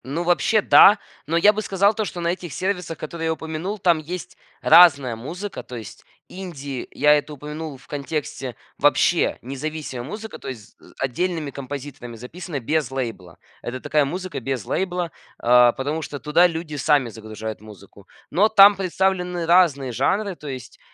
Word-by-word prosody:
Ну 145 +6 -3
вообще 175 +5 +2
да. 205 +1 +7 0.3
Но 165 +2 +1
я 205 +5 +6
бы 215 - -2
сказал 200 0 +2
то, 215 0 -2
что 175 - -6
на 170 - 0
этих 175 -2 -4
сервисах, 180 -4 -3
которые 165 +1 -5
я 160 - +1
упомянул, 160 +6 -5
там 175 -4 +3
есть 170 +3 -7 0.3
разная 140 -9 +6
музыка. 175 - -6
То 125 +1 -9
есть 110 -2 -9 0.2
инди 145 -8 -7
я 150 0 +4
это 150 0 0
упомянул 150 +1 -7
в 125 - -21
контексте 140 -3 -4 0.2
вообще - - +3
независимая 140 0 -5
музыка, 215 +5 -7
то - - -10
есть 115 -6 -9
з - - -18
отдельными 155 +3 -2
композиторами 135 -3 -7
записана 145 +6 -7
без 150 +2 -1
лейбла. 115 -10 -5 0.2
Это 125 +2 -5
такая 150 +2 +1
музыка 180 +3 -4
без 130 -4 -3
лейбла, 180 -3 -2 0.3
а, 120 0 +5
потому 145 +4 -3
что 145 -2 -6
туда 160 +5 +4
люди 165 -2 -5
сами 145 -3 +2
загружают 110 -1 -7
музыку. 100 -1 -15 0.2
Но 210 +4 +4
там 205 -1 +8
представлены 180 -2 -1
разные 165 -7 +3
жанры, 190 - 0
то 150 - -11
есть 130 -3 -8
155 Hz, 165 wpm, -22 LUFS, 130-180 Hz, 0.3 s, там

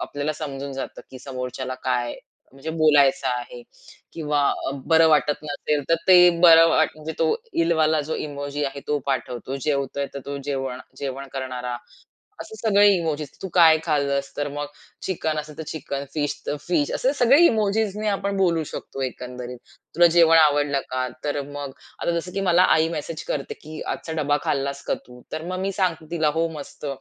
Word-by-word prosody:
आपल्याला 145 +2 -3
समजून 140 -2 -5
जातं, 135 - -6
की 130 - -10
समोरच्याला 130 0 -5
काय 120 -2 0 0.4
म्हणजे 135 +4 -6
बोलायचं 145 -3 +4
आहे? 125 -1 -4 0.5
किंवा 150 -2 -1 0.5
बरं 160 -1 +5
वाटत 150 -1 +3
नसेल, 145 0 -1
तर 165 - +5
ते 180 -1 +8
बरं 165 -1 +8
म्हणजे 155 0 0
तो - - +2 0.2
इलवाला 160 -2 +2
जो 160 - -2
इमोजी 145 0 -4
आहे, 140 0 -4
तो 150 - +1
पाठवतो. 130 -1 -3
जेवतोय, 140 -1 -1
तर 140 - -5
तो 140 0 -4
जेवण 135 -3 -3 0.2
जेवण 140 0 -5
करणारा 125 -2 -4 0.6
असे 440 - -8
सगळे 205 - +4
इमोजीस 155 -4 -2
तू 190 - -4
काय 160 -3 +7
खाल्लस? 140 -3 0
तर 145 0 -1
मग 145 +1 -4 0.4
चिकन 160 -4 -1
असेल, 150 0 -7
तर - - -3
चिकन, 140 -2 -4
फिश 145 -2 -1
तर 145 - -1
फिश 155 -5 +1
असे 265 - +1
सगळे 265 +2 +5
इमोजीज 215 - +1
नी 215 0 -1
आपण 200 0 -1
बोलू 170 -4 +2
शकतो, 135 -2 -7
एकंदरीत. 125 -1 -6 0.4
तुला 175 0 +7
जेवण 165 -1 +7
आवडलं 145 -2 +3
का? 130 0 -1 0.2
तर 145 -1 -1
मग 145 -1 -6 0.3
आता - - +1
जसं, 180 +2 -7
की 195 - -2
मला 180 -2 +4
आई 160 0 +2
मेसेज 160 0 -5
करते, 140 - -3
की 155 0 -10
आजचा 160 - -4
डब्बा 145 +1 +2
खाल्लास 140 0 -1
का - - +1
तू? 125 0 -14
तर 155 - -3
मग 185 +1 -3
मी 195 +1 -1
सांगते 170 -5 -1
तिला 160 -3 +1
हो 165 0 +2
मस्त. 145 +1 -9
150 Hz, 175 wpm, -23 LUFS, 140-165 Hz, 0.6 s, ते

